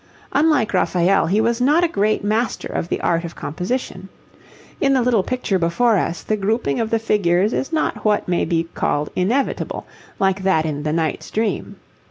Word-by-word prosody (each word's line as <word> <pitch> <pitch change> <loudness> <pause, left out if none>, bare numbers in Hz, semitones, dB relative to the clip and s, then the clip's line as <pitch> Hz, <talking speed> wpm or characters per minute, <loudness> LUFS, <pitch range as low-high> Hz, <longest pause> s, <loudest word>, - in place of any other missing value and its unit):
Unlike 285 -6 +2
Raphael, 185 0 +2
he 200 +5 +2
was 230 +2 +1
not 295 +7 +4
a - - +4
great 215 -8 0
master 220 +2 -1
of 170 - -4
the - - -1
art 170 0 +1
of 170 0 -7
composition. 185 - -4 0.7
In 275 -1 +3
the 260 - +3
little 235 -4 +3
picture 215 -3 -1
before 210 +8 +2
us 175 -1 -2
the 215 - 0
grouping 205 - 0
of 225 -1 -1
the 225 - +2
figures 205 -2 +1
is 270 - -2
not 315 -1 -1
what 210 -1 +1
may 175 -1 +1
be 165 -1 0
called 145 +1 -1
inevitable, 235 +10 -1 0.3
like 195 -1 +1
that 190 -4 +2
in 150 -2 -3
the 150 +1 -2
'Knight's 160 -1 -2
Dream.' 215 -3 -2
205 Hz, 185 wpm, -20 LUFS, 175-235 Hz, 0.7 s, not